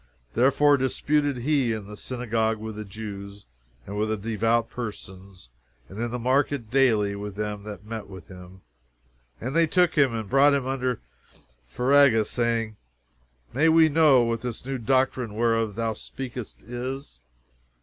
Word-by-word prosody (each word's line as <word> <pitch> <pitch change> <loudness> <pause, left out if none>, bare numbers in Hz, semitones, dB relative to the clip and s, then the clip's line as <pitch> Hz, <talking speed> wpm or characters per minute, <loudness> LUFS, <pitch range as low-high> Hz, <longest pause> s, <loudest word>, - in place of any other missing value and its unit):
Therefore 140 +4 +4
disputed 145 +1 0
he 130 -2 +1
in 110 -2 -5
the 105 +1 -9
synagogue 115 -2 -1
with 110 0 -7
the 105 - -5
Jews, 100 -1 -8 0.4
and 100 - -7
with 105 +1 0
the 110 - 0
devout 115 +2 0
persons, 95 - -9 0.4
and 100 +4 -7
in 120 - -1
the 125 - -3
market 130 -1 0
daily 110 -7 +3
with 100 -1 -6
them 105 0 -4
that 105 -1 -8
met 110 -2 -6
with 95 -4 -11
him. 90 0 -13 0.8
"And 130 +5 -4
they 165 0 +4
took 180 +2 +3
him 140 -4 +4
and 110 -2 -4
brought 140 +4 +5
him 135 -2 -1
unto 130 -2 -1 0.8
Areopagus, 125 -4 +4
saying, 115 -3 -1 0.8
May 155 +6 +3
we 160 0 +6
know 145 -5 +5
what 115 0 -1
this 120 -1 -6
new 135 -1 -3
doctrine 125 -2 0
whereof 115 -2 +1
thou 115 0 -1
speakest 125 +1 -8
is? 125 - -6
115 Hz, 155 wpm, -25 LUFS, 105-135 Hz, 0.8 s, we